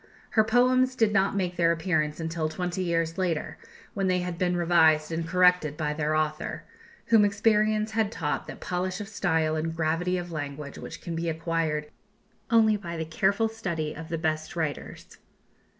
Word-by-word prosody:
Her 220 - +4
poems 255 +3 +3
did 220 -4 +2
not 200 -1 +2
make 180 -3 -1
their 170 -1 +4
appearance 160 -3 0
until 160 -1 -2
twenty 180 +2 -3
years 165 0 -1
later, 175 -4 -2 0.3
when 195 -1 -1
they 180 -1 +1
had 180 -1 -4
been 180 -1 +1
revised 160 -3 +4
and 165 0 -2
corrected 180 -4 +3
by 150 -1 -1
their 155 0 -1
author, 155 0 -2 0.5
whom 225 -2 +6
experience 215 +1 +2
had 220 -1 0
taught 155 -8 -3
that - - -8
polish 180 +1 -3
of 205 - -6
style 160 -6 0
and 160 +1 -2
gravity 165 +3 0
of 175 -1 -5
language 145 -2 -6
which - - -8
can 170 -2 -4
be 165 0 -2
acquired 160 -2 -2 0.6
only 220 -2 +4
by 170 -4 -6
the 160 - -3
careful 195 +7 +1
study 170 -9 -3
of 165 +1 -8
the 165 - -2
best 155 0 -2
writers. 160 -4 -5
170 Hz, 175 wpm, -27 LUFS, 160-195 Hz, 0.6 s, whom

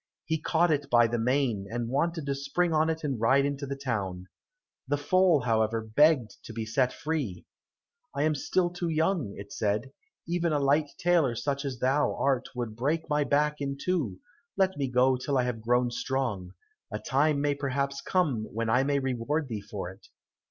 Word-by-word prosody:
He 160 0 -1
caught 170 +1 +2
it 145 -2 0
by 120 -1 +6
the 115 +1 -1
mane, 120 -4 0
and 120 +1 -3
wanted 160 +5 -1
to 140 - 0
spring 140 +5 0
on 155 +1 +3
it 160 0 -2
and 135 -6 -2
ride 135 +4 +4
into 140 0 -3
the 140 - -3
town. 100 -9 -3 0.6
The 145 - +1
foal, 175 +1 +3
however, 115 -1 +1
begged 125 0 +3
to 115 - -8
be 115 0 -4
set 125 +3 +1
free. 145 - -3 0.7
"I 145 - +1
am 155 0 +3
still 175 +5 0
too 175 -1 -3
young," 160 - 0
it 100 0 -9
said, 105 +5 -1 0.4
"even 170 -1 0
a 145 - +2
light 145 +2 +2
tailor 170 -9 +2
such 140 +4 -2
as 135 -2 -3
thou 135 +4 +1
art 135 -2 0
would 120 -3 -4
break 150 +7 -1
my 150 0 +3
back 150 +1 +1
in 140 0 -2
two 150 - -1 0.4
let 190 -1 +2
me 140 -2 -1
go 125 +1 +3
till 135 +2 -1
I 125 - +3
have 125 -3 -3
grown 120 +2 +2
strong. 115 -9 -2 0.4
A 105 - -2
time 140 +5 +1
may 145 0 +1
perhaps 140 0 -2
come 145 -13 0
when 115 +1 -2
I 125 +3 +4
may 140 +1 +1
reward 135 +3 -1
thee 110 -3 -4
for 100 -3 -6
it." 95 - -17
135 Hz, 195 wpm, -28 LUFS, 115-150 Hz, 0.7 s, by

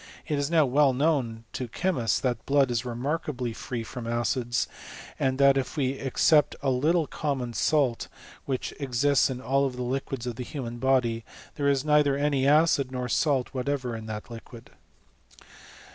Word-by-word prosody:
It 150 -3 0
is 140 0 -1
now 165 -3 +4
well 135 +1 +3
known 130 -5 0
to 125 - -4
chemists, 125 - 0
that 120 -4 -2
blood 140 -2 +3
is 115 -2 0
remarkably 125 0 -3
free 120 +1 -5
from 115 +1 -7
acids; 120 +1 0 0.5
and, 130 -1 +1
that 140 0 +5
if 135 +3 -3
we 135 -3 +1
except 140 +3 +2
a 135 - +2
little 155 +6 +2
common 135 -6 -3
salt, 135 -3 +1 0.4
which 130 -2 -3
ex 130 -2 -2
ists 140 -1 +4
in 130 -1 -4
all 135 +1 +1
the 125 -1 -5
liquids 130 0 -3
of 120 -2 -4
the 125 - -4
human 120 -3 -6
body, 120 -3 +1 0.3
there 140 -1 0
is 140 0 +1
nei 150 0 +5
ther 140 -2 +1
any 140 -2 +1
acid 145 -3 +3
nor 125 -1 -3
salt 135 0 +1
whatever 130 -2 -2
in 110 -1 -7
that 110 +2 -6
liquid. 115 0 -11
130 Hz, 175 wpm, -27 LUFS, 120-145 Hz, 0.5 s, that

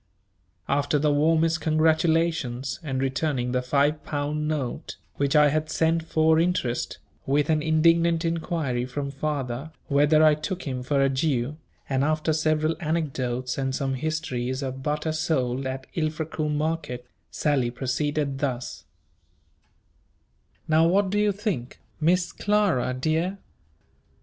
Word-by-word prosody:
After 145 +1 +1
the 145 0 +2
warmest 160 +2 +2
congratulations 160 -4 +1
and 135 -5 -3
returning 135 -1 -1
the 125 0 +1
five 145 +4 +1
pound 150 +1 -2
note, 145 -6 -3 0.2
which 140 +2 +1
I 150 -1 +6
had 155 +1 -1
sent 165 +1 +1
for 160 0 +3
interest, 165 -8 0 0.3
with 145 +3 +2
an 155 -1 +2
indignant 165 +1 +3
inquiry 160 -7 -1
from 140 +2 -4
father 140 -1 -3 0.2
whether 150 +2 +4
I 155 -1 +7
took 175 +5 -4
him 130 -3 -3
for 135 +2 +1
a 135 - +3
Jew, 135 0 0 0.3
and 135 -1 +1
after 155 +1 +1
several 155 +1 +1
anecdotes 135 -6 -2
and 135 -1 -1
some 135 -1 -1
histories 130 -3 -2
of 135 0 -4
butter 150 +2 -1
sold 135 -5 -1
at 130 0 -5
Ilfracombe 155 -1 -2
market, 150 -5 -2 0.2
Sally 140 -5 +1
proceeded 140 +3 -2
thus: 125 -3 -3 1.8
"Now 160 +1 +4
what 190 +2 +2
do 205 - +1
you 210 0 +3
think, 190 - -4 0.2
Miss 175 +3 +2
Clara 200 -12 +1
dear? 160 +8 0
150 Hz, 130 wpm, -25 LUFS, 135-160 Hz, 1.8 s, I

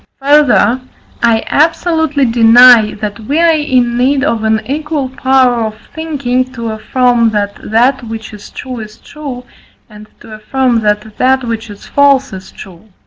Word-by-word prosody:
Further, 275 -3 +3 0.4
I 230 -1 +2
absolutely 320 -2 0
deny, 230 -1 +5
that 205 0 -6
we 270 +8 -3
are 335 -1 +4
in 255 -6 0
need 270 +2 +1
of 230 -7 -1
an 220 0 +1
equal 295 -1 -3
power 260 -3 +1
of 215 -1 -5 0.2
thinking, 280 -6 -2
to 230 -3 -5
affirm 235 +1 +1
that 205 -2 -3
that 245 +4 +1
which 225 -1 -8
is 210 -1 -12
true 255 -3 -8
is 215 0 -10
true, 275 -5 -9 0.4
and 210 -1 -14
to 220 - -12
affirm 240 +3 -1
that 210 0 -2
that 260 0 +2
which 230 -1 -5
is 205 -1 -12
false 275 -3 +2
is 190 0 -10
true. 190 +2 -14
245 Hz, 155 wpm, -12 LUFS, 220-275 Hz, 0.4 s, deny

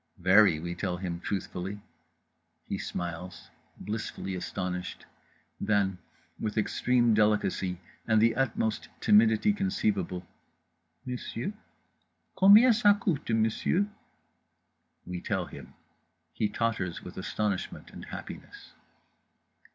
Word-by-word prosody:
_" - - -18
"Very," 95 -3 +6
we 85 +2 -4
tell 90 -1 -2
him 90 -2 -4
truthfully. 95 +1 -4 0.9
He - - -4
smiles, 90 +1 -6 0.3
blissfully 105 -2 -4
astonished. 90 0 -4 0.5
Then, 100 -3 +1 0.4
with 110 0 -3
extreme 120 +2 +2
delicacy 105 -4 +1 0.3
and 110 -1 +4
the 115 +1 +4
utmost 115 -4 -1
timidity 110 - +5
conceivable 100 - -1 0.8
"monsieur, 125 - -4 0.8
combien 210 +6 +8
ça 205 -3 +4
coute, 155 -11 -1
monsieur?" 115 - +2 1.2
We 90 -1 -5
tell - - -1
him. - - -12 0.6
He 105 +5 0
totters 105 -6 -2
with - - -9
astonishment 105 -3 -3
and - - -9
happiness. - - -9
105 Hz, 100 wpm, -29 LUFS, 90-115 Hz, 1.2 s, combien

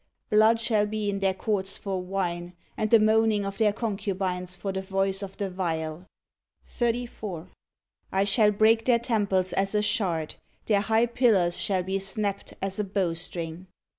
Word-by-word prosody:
blood 220 +2 +5
shall 215 -3 +2
be 210 -1 -2
in 195 - -3
their 195 -1 +2
courts 195 -1 -1
for 190 -2 -3
wine, 180 -2 -3 0.2
and 215 - -1
the 230 - +7
moaning 215 -1 +3
of 195 +2 -5
their 215 -2 +4
concubines 190 -4 -2
for 195 +1 -3
the 190 0 -3
voice 195 0 -1
of 195 -1 -7
the 200 - -2
viol. 170 -2 -3 0.6
34. 230 -7 -3 0.6
I 190 +1 +2
shall 210 +2 +4
break 220 +2 +3
their 245 -2 +4
temples 205 -6 0
as 195 +2 0
a 210 - +2
shard; 190 -8 0 0.3
their 205 -2 +2
high 220 +2 +2
pillars 220 -8 +2
shall 190 -2 +2
be 190 +2 -2
snapt 200 +1 -3
as 195 +1 -2
a - - +1
bow 190 -3 -1
string. 170 +1 -6
195 Hz, 165 wpm, -26 LUFS, 185-215 Hz, 0.6 s, the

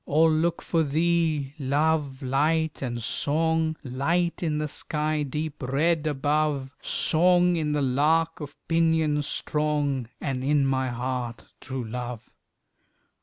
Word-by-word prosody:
All 160 +2 +4
look 165 +2 0
for 165 - +1
thee, 160 -2 +1
Love, 145 0 0
Light, 155 +4 +1
and 120 -3 -3
Song, 160 +5 +1
Light 165 +7 -1
in 155 -3 0
the 150 0 -1
sky 150 +1 -2
deep 150 +2 -4
red 150 +5 +1
above, 145 -1 0
Song, 180 +2 +3
in 155 -3 -1
the 145 -1 +1
lark 155 +5 +2
of 145 -2 -8
pinions 160 -3 +2
strong, 145 -5 -1
And 130 -2 -3
in 145 0 +2
my 130 -1 0
heart, 120 -1 -4
true 130 -2 -5
Love. 120 0 -6
150 Hz, 125 wpm, -26 LUFS, 135-160 Hz, -, All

